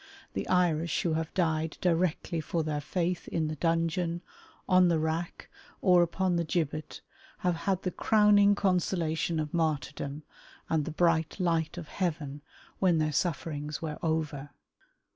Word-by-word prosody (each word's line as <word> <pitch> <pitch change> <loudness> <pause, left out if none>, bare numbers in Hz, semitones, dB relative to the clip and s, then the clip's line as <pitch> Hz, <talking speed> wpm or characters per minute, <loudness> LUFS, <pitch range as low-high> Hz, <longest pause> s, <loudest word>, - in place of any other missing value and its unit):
The - - -3
Irish 170 -3 +2
who 170 - +1
have 160 0 -2
died 160 -3 0
directly 170 -1 0
for 165 +1 -1
their 150 -1 -2
faith 175 +3 -2
in 160 -2 -1
the 155 - -3
dungeon, 165 +2 0 0.4
on 185 -1 +5
the 170 -2 +3
rack, 160 +2 -3 0.3
or 180 -2 +5
upon 175 +1 +1
the 170 - +1
gibbet, 155 -2 -2 0.4
have 180 -1 +3
had 190 +2 -1
the 185 - -1
crowning 205 -1 +4
consolation 170 -4 0
of 150 -1 -3
martyrdom 150 -2 -2 0.5
and 155 -2 +2
the - - -4
bright 160 +1 +1
light 165 -2 0
of 170 -3 -6
heaven 150 -6 -3 0.4
when 180 -4 +3
their 155 -1 0
sufferings 150 -2 -2
were 155 -2 -4
over. 155 -3 -2
165 Hz, 145 wpm, -29 LUFS, 155-180 Hz, 0.5 s, on